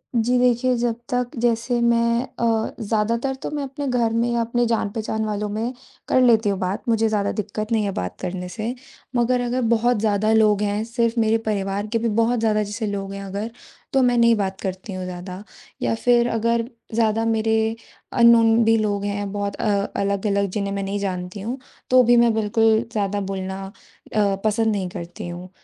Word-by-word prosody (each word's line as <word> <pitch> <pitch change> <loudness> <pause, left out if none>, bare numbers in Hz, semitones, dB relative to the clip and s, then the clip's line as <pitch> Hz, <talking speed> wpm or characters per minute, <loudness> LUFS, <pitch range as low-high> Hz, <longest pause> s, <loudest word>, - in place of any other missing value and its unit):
जी, 240 +2 +2
देखिए, 250 +1 +3
जब 235 -1 0
तक 245 0 -1
जैसे 240 +1 +1
मैं 235 0 +3 0.2
अ, 225 -2 0
ज़्यादातर 230 +4 0
तो - - -2
मैं 295 -1 -3
अपने 275 +1 -5
घर 235 -3 +1
में 235 +1 +1
या 235 - +1
अपने 240 +1 0
जान-पहचान 220 -1 -1
वालों 210 0 -2
में 225 +5 -2 0.3
कर 255 - +3
लेती 225 -4 +4
हूँ 195 -1 -1
बात, 185 +2 -2
मुझे 225 -1 +3
ज़्यादा 205 -2 0
दिक्कत 215 +1 -4
नहीं 220 -2 +2
है 200 - -1
बात 90 - -4
करने 180 0 -4
से। 225 +5 -4 0.4
मगर 245 +1 +2
अगर 245 +1 -1
बहुत 240 +1 +2
ज़्यादा 215 0 +1
लोग 215 -2 +4
हैं, 205 +1 0
सिर्फ़ 230 0 0
मेरे 220 0 +3
परिवार 205 -2 -2
के 230 +2 0
भी 230 +1 0
बहुत 240 +1 +1
ज़्यादा 215 -1 +2
जैसे 210 +2 -4
लोग 195 -1 -4
हैं 200 0 -6
अगर, 200 +4 -4 0.4
तो 270 - +4
मैं 245 -1 +3
नहीं 235 -1 +5
बात 195 -2 -2
करती 190 +1 -5
हूँ 185 0 -4
ज़्यादा। 180 +1 -7 0.4
या - - +1
फिर 240 +1 +3
अगर 230 +1 +1 0.3
ज़्यादा 225 -1 +2
मेरे 220 0 +1 0.4
अननोन 230 -1 +6
भी 225 0 +5
लोग 205 -2 -1
हैं 205 0 -3
बहुत 200 0 -3
अ, - - -4 0.3
अलग-अलग, 200 0 0
जिन्हें 200 +1 -2
मैं 200 - -2
नहीं 200 +1 -2
जानती 185 0 -4
हूँ, 240 +6 -4 0.3
तो 255 0 +6
भी 240 0 +5
मैं 235 -1 +5
बिल्कुल 220 +1 +3
ज़्यादा 205 -1 -1
बोलना 190 0 -4 0.5
अ, 200 -2 +3
पसंद 225 +1 +2
नहीं 195 -3 -2
करती 175 -2 -7
हूँ। 175 +1 -7
220 Hz, 190 wpm, -22 LUFS, 200-235 Hz, 0.5 s, अननोन